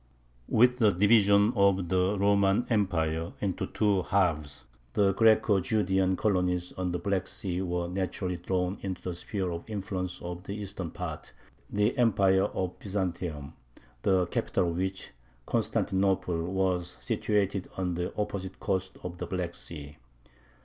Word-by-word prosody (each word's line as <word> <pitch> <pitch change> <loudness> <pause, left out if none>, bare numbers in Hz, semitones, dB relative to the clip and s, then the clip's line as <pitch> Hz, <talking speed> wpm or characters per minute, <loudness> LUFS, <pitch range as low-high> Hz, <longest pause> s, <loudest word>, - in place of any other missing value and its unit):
With 125 +2 +4
the 110 -3 +6
division 100 +2 +5
of 100 -3 +3
the 95 +2 +2
Roman 100 +2 +3
Empire 85 -6 0
into 95 -3 -2
two 105 -3 +2
halves 80 -8 0 0.3
the 100 -1 +3
Greco 110 -1 +4
Judean 95 -2 +1
colonies 90 -3 0
on 90 -1 -2
the 90 - -1
Black 95 +1 -1
Sea 90 -2 -3
were 90 -2 -1
naturally 90 0 -2
drawn 90 +2 -1
into 95 -2 -4
the 90 - -3
sphere 90 +1 -3
of 85 +5 -6
influence 95 -3 -3
of 90 0 -5
the 100 - -4
eastern 100 -4 -5
part, - - -6 0.4
the 105 +3 +1
Empire 95 -5 +4
of 95 -1 -3
Byzantium, 85 -7 -3 0.5
the 95 +2 +3
capital 85 0 0
of 85 - -4
which, 95 +1 -3 0.3
Constantinople, 95 -3 0
was 90 -2 -1
situated 100 -2 0
on 90 -2 -1
the 90 +1 -2
opposite 95 -2 -3
coast 95 0 -2
of 90 0 -6
the - - -4
Black 90 -2 -3
Sea. 75 -4 -8
95 Hz, 140 wpm, -29 LUFS, 90-100 Hz, 0.5 s, the